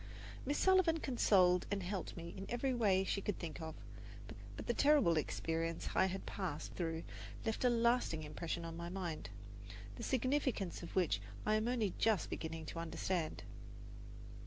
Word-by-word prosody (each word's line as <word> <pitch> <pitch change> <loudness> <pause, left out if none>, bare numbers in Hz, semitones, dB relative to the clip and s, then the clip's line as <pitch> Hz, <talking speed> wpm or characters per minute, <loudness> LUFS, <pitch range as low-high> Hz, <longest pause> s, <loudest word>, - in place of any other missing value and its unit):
Miss 285 - +1
Sullivan 375 -4 +4
consoled 185 - +4
and 200 -2 -1
helped 185 0 -4
me 170 0 -6
in 195 0 -6
every 255 +2 0
way 200 -6 +3
she 200 +1 -1
could 205 -1 -2
think 165 -1 -6
of; 160 0 -5 0.8
but - - -6
the - - +1
terrible 285 - +5
experience 165 +2 -1
I 190 - +4
had 190 +1 -4
passed 170 -6 -4
through 165 -2 -2 0.4
left 220 +2 -1
a 250 - +6
lasting 235 -9 +2
impression 165 +3 -4
on 165 0 -5
my 170 +1 -5
mind, 175 - -4 0.7
the - - -6
significance 255 - 0
of 170 - -8
which 165 - +2 0.2
I 215 - +3
am 215 +1 +2
only 230 -6 +1
just 220 -4 +2
beginning 160 0 -4
to 165 - -5
understand. 165 0 -2
190 Hz, 160 wpm, -37 LUFS, 165-235 Hz, 0.8 s, a